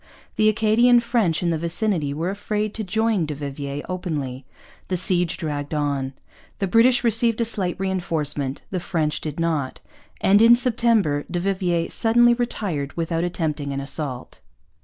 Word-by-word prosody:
The 215 0 +4
Acadian 230 +3 +4
French 225 -9 0
in 170 - +1
the 160 - -1
vicinity 170 -2 0
were 165 +6 -2
afraid 210 +1 -3
to 220 - -4
join 215 -3 0
du 150 - -4
Vivier 140 0 -5
openly. 145 -8 -4 0.4
The 185 - -1
siege 180 -1 +1
dragged 145 -2 -4
on. 140 -2 -1 0.4
The 195 - -1
British 235 +6 +4
received 230 0 +2
a 230 - +2
slight 190 -6 -2
reinforcement. 155 -7 -2
The 185 - -1
French 155 -3 -2
did 155 0 -5
not. 155 -6 -1 0.4
And 200 +2 +4
in 230 +1 +8
September 230 - +1
du 175 - -2
Vivier 180 -3 -1
suddenly 240 +1 +4
retired 195 - -3
without 165 0 -1
attempting 155 -5 -2
an 135 - -3
assault. 140 -2 -5
175 Hz, 155 wpm, -22 LUFS, 150-215 Hz, 0.4 s, in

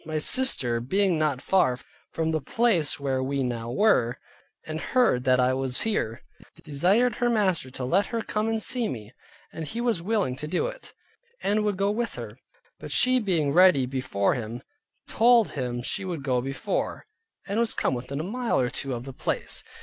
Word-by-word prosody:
My 155 -1 -3
sister 150 - +2
being 180 +7 +1
not 145 -4 0
far 155 -10 +2 0.3
from 160 0 -1
the 155 -1 -1
place 165 - +1
where 135 -2 -1
we 135 +1 -1
now 120 -2 -3
were, 125 - +2 0.5
and 155 0 -5
hearing 245 - +2
that 130 0 +3
I 125 +1 +3
was 130 -1 -1
here, 120 - -2 0.4
desired 190 - +2
her 245 - +1
master 190 - +1
to 130 0 -5
let 190 +10 +2
her 230 -2 -3
come 215 +1 -1
and 225 0 0
see 235 +1 +1
me, 110 -1 -7 0.4
and 160 -1 -6
he 230 - -4
was 235 -7 0
willing 200 - 0
to 150 - -2
it, - - -8 0.5
and 210 +2 +1
would 205 -2 0
go 200 +1 +1
with 230 +2 -2
her; - - -8 0.4
but - - -8
she 255 0 +3
being 170 - +1
ready 180 -6 +6
before 125 -6 0
him, 120 +1 -5 0.4
told 235 -1 +4
him 120 -3 -3
she 195 - -1
would 175 -6 -4
go 130 -2 +1
before, 135 +1 -3 0.4
and 205 +3 -1
was 235 -2 +2
come - - 0
within 125 +3 -4
a - - -2
mile 235 +6 -1
or 125 -1 0
two 135 -2 -3
of 120 - -6
the 135 - -8
place. - - -1
155 Hz, 190 wpm, -26 LUFS, 130-215 Hz, 0.5 s, ready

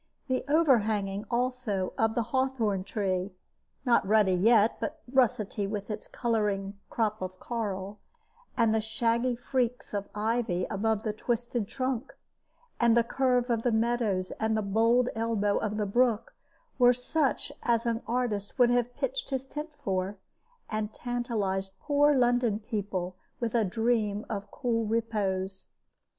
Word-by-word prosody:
The 260 -1 0
overhanging, 220 -10 +2
also, 240 -6 -1
of 225 0 +1
the 235 - +2
hawthorn 250 -7 +1
tree 190 -2 -2 0.5
(not 240 -2 +4
ruddy 205 -1 +4
yet, 215 +4 +4
but 310 +1 -4
russety 215 -5 +2
with 205 +1 -4
its 210 - -6
coloring 205 -4 -1
crop 215 -2 -1
of 185 0 -5
coral), 205 -3 -4 0.6
and 230 -2 +4
the 220 - +2
shaggy 235 +3 +1
freaks 245 -1 -2
of 200 -1 -3
ivy 215 -4 0
above 220 +1 0
the 215 - -1
twisted 240 0 -2
trunk, 260 0 -3 0.6
and 235 -1 +4
the 235 - +5
curve 250 0 +1
of 230 -1 +1
the 245 - +1
meadows 220 -5 +1
and 220 -2 0
bold 235 +3 +4
elbow 220 -3 +1
of 210 -1 -2
the 210 - 0
brook, 230 +1 +1 0.5
were 245 0 +7
such 265 +3 0
as 235 0 +1
an 230 0 0
artist 230 -5 -1
would 245 -2 +5
have 245 0 +1
pitched - - -2
his 265 -1 -2
tent 300 +3 -6
for, 190 +1 -1 0.5
and 215 0 -3
tantalized 210 -6 -2
poor 290 0 +3
London 245 -3 +3
people 200 -5 -3 0.2
with 235 -2 -2
a 235 -2 +3
dream 215 0 0
of 200 -2 -4
cool 235 -3 -1
repose. 200 -4 -1
225 Hz, 140 wpm, -29 LUFS, 205-245 Hz, 0.6 s, were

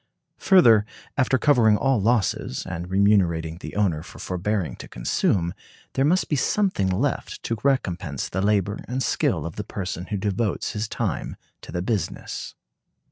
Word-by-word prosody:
Further, 120 - +6 0.3
after 130 -1 +2
covering 120 -7 +4
all 135 -3 +2
losses, 110 - 0
and 90 -1 -5
remunerating 90 -5 +2
the - - -8
owner 95 -7 +1
for 85 - -12
forbearing 95 0 -2
to - - -9
consume, 85 +8 0 0.4
there 135 - +1
must 175 +6 +2
be 150 - 0
something 165 - +1
left 115 +9 -2
to 115 - -2
recompense 95 - 0
the 95 - -2
labor 100 0 +1
and 130 +2 -2
skill - - 0
of 85 - -6
the 105 - -2
person 90 -3 -5
who 105 - -2
devotes 100 +1 -1
his 105 +1 -3
time 105 -9 -3 0.3
to - - -10
the 90 - -2
business. 105 -4 -3
100 Hz, 155 wpm, -24 LUFS, 90-120 Hz, 0.4 s, Further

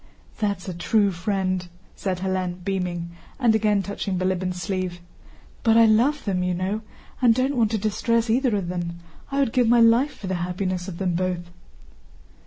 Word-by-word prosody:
"That's 200 -4 -1
a 185 - -3
true 200 +4 +2
friend!" 185 0 -1 0.3
said 185 -2 -3
Hélène 185 -1 -2
beaming, 180 -3 -2 0.3
and 240 -4 +4
again 210 -2 +2
touching 195 -1 -3
Bilíbin's 185 0 -1
sleeve. 185 -1 -3 0.6
"But 225 -1 +4
I 230 - +8
love 245 +7 +3
them, 190 -3 0
you 180 0 0
know, 190 +4 -2 0.4
and 235 -3 +5
don't 260 +3 +1
want 230 -3 +3
to 220 - 0
distress 230 +3 0
either 240 0 +2
of 195 -4 -2
them. 175 -1 -4 0.3
I 275 - -2
would 275 -5 +1
give 250 -3 +3
my 240 +1 +5
life 235 +5 +4
for 205 - -8
the 190 - -2
happiness 180 0 -2
of 180 -3 -6
them 185 -2 0
both." 175 -1 -2
195 Hz, 180 wpm, -24 LUFS, 180-225 Hz, 0.6 s, I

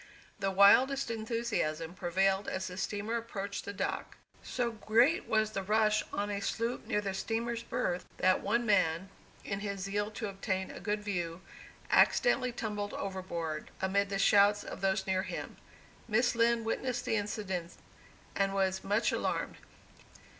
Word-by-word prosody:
The 195 -1 0
wildest 230 +7 +5
enthusiasm 220 -8 -2
prevailed 190 +2 +1
as 190 0 -2
the 180 -1 -6
steamer 205 +4 -2
approached 200 -3 -5
the - - -4
dock. 200 - -3 0.2
So 245 -2 -2
great 230 - +2
was 215 -1 +2
the 195 - -2
rush 215 +2 +3
on 205 +1 -2
a 200 - -2
sloop 230 +4 -2
near 210 - +1
the 195 -2 -3
steamer's 230 +3 -2
berth, 235 -7 -2
that 185 0 +3
one 235 +4 +1
man, 190 -4 +2 0.4
in 200 -1 -2
his 200 -1 -4
zeal 205 +2 -1
to 215 0 -5
obtain 190 -1 -3
a - - -8
good 210 0 -2
view, 175 -4 -3 0.5
accidentally 255 - +4
tumbled 210 -3 -4
overboard, 170 -5 -4
amid 200 +1 +1
the 195 - -1
shouts 205 +1 +5
of - - -8
those 190 0 +1
near 190 -1 +1
him. 195 - -6 0.5
Miss 235 +2 +2
Lind 230 0 +2
witnessed 245 +2 -2
this 220 - +1
incident, 190 -4 -4 0.6
and 195 0 +1
was 190 -1 +1
much 210 +4 +1
alarmed. - - -2
205 Hz, 155 wpm, -32 LUFS, 190-225 Hz, 0.6 s, wildest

